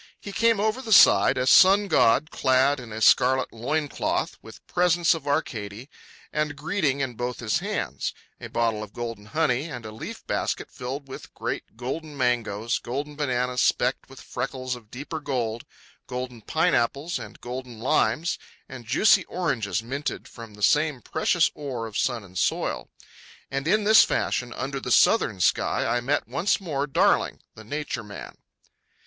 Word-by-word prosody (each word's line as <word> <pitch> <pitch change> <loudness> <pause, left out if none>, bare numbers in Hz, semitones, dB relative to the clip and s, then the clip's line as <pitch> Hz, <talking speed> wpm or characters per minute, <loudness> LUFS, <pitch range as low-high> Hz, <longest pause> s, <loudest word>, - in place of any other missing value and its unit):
He 200 - -8
came 230 +1 +2
over 220 +4 0
the 230 -4 -7
side, 200 - +7
a 125 - +1
sun 195 +9 +6
god 155 -3 +3
clad 135 +2 +2
in 120 -3 -10
a 110 +1 -6
scarlet 130 +4 +4
loin 145 +7 -1
cloth, - - -2
with - - -14
presents 175 -1 +3
of 155 -4 -7
Arcady 115 -3 -3 0.4
and 150 -1 -1
greeting 145 -2 -1
in 130 -2 -2
both 120 +1 -4
his 110 -3 0
hands—a - - -5
bottle 115 -2 0
of 105 -1 -8
golden 115 -3 -6
honey 145 +1 0
and 125 -8 -7
a 110 - -7
leaf 110 - -8
basket - - -2
filled 135 +3 -6
with 135 - -10
great - - -5
golden 145 +5 -5
mangoes, 120 -3 0
golden 145 +5 -5
bananas 125 -3 0
specked - - +1
with - - -13
freckles 130 -1 -4
of 115 -3 -14
deeper 145 +6 -6
gold, 120 -6 -3 0.4
golden 125 -2 -5
pine 160 +9 +1
apples 140 +8 0
and - - -10
golden 125 -1 -7
limes, 155 +7 +1 0.3
and 120 -2 -10
juicy 200 - +4
oranges 115 - -2
minted 140 +5 -4
from 115 -3 -11
the 105 - -8
same 150 +3 +2
precious 165 +1 +1
ore 130 -6 -5
of 110 -2 -9
sun 120 -4 0
and 95 -1 -7
soil. - - -1 0.6
And 135 +2 -2
in 215 +5 +3
this 215 +1 +7
fashion 125 -1 -1
under 135 +2 -4
the 125 - -6
southern 110 - +4
sky, - - +2
I 120 - +1
met 140 +4 0
once 175 +5 +1
more 145 -7 -2
Darling, 140 - +2
the 110 - -12
Nature 145 -1 -4
Man. 105 -1 -10
130 Hz, 165 wpm, -25 LUFS, 120-155 Hz, 0.6 s, side